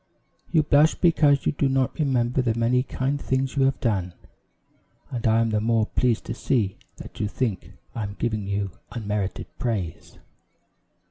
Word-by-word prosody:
You 160 -3 +4
blush 150 +2 +4
because 150 -5 +3
you - - +3
do 140 -2 0
not 135 +2 0
remember 130 -3 +1
the 115 -3 0
many 120 +2 +2
kind 135 +2 -2
things 130 +1 -1
you 135 -1 +3
have 135 - +1
done, 95 -7 -1 1.0
and 120 -3 -2
I 110 +1 +4
am 115 -1 +1
the 105 -1 +1
more 115 0 +2
pleased 120 0 0
to 115 - -3
see 115 -5 0 0.2
that - - -11
you 105 - 0
think 105 -1 -3 0.2
I 115 - -4
am 100 -1 -4
giving 110 -4 -2
you 100 -1 -2 0.2
unmerited 105 -4 -3
praise. 95 -9 -3
120 Hz, 165 wpm, -25 LUFS, 105-135 Hz, 1.0 s, You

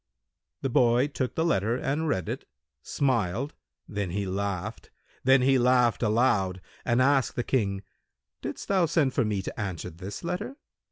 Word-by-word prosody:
The 135 - +1
boy 120 +3 +4
took 130 -3 -3
the 160 - +1
letter 115 - +2
and 150 +5 -1
read 95 - 0
it, - - -4 0.4
smiled; 125 - 0 0.3
then 100 -3 -3
he 100 +3 -2
laughed; 100 +2 -3 0.3
then 130 0 +5
he 135 0 +4
laughed 125 -1 +3
aloud 105 -5 +2 0.2
and 120 +1 +3
asked 135 -1 +2
the 120 - -1
King, 100 -7 0 0.6
"Didst - - -5
thou 190 -4 +3
send 150 -5 +2
for 130 - +2
me 105 -3 -1
to - - -6
answer 95 -6 -4
this 95 +5 -8
letter?" 180 +10 -3
120 Hz, 160 wpm, -27 LUFS, 100-135 Hz, 0.6 s, then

